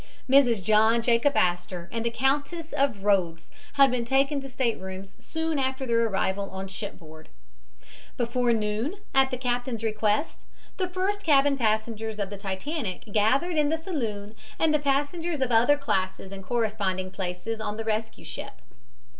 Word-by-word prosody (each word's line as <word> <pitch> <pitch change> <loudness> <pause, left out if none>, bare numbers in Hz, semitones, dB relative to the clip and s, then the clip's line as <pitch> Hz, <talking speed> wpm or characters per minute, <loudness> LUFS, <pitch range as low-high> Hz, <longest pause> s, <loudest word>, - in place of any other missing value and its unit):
Mrs. 250 -6 +4
John 220 +3 +4
Jacob 240 +4 +3
Astor 175 0 0
and 230 -1 -2
the 235 - +1
Countess 285 +7 -1
of 265 -8 0
Rothes 175 -5 +1 0.2
had 275 -2 +6
been 250 -1 0
taken 275 +4 +2
to 270 - -8
staterooms 195 -7 -3
soon 320 -2 -2
after 265 0 -1
their 230 -1 +2
arrival 195 -1 -1
on 190 0 -6
shipboard. 170 -5 -9 0.9
Before 240 0 +1
noon, 220 - -1 0.2
at 270 0 +4
the 255 - -3
captain's 245 -2 -2
request, 215 +5 0 0.3
the 370 -2 -1
first 385 +3 -1
cabin 285 -2 +4
passengers 220 -2 -1
of 200 -1 -3
the 205 - -6
Titanic 200 - -4
gathered 270 +11 +2
in 295 -1 +3
the 320 - +1
saloon 225 - -4 0.2
and 320 -1 +3
the 300 - +3
passengers 290 +4 0
of 260 -2 0
other 240 +6 +5
classes 190 -8 -2
in 195 0 -7
corresponding 195 -3 -1
places 190 +4 -4
on 210 -1 -3
the 225 - -3
rescue 220 0 -3
ship. - - -7
230 Hz, 155 wpm, -26 LUFS, 205-275 Hz, 0.9 s, had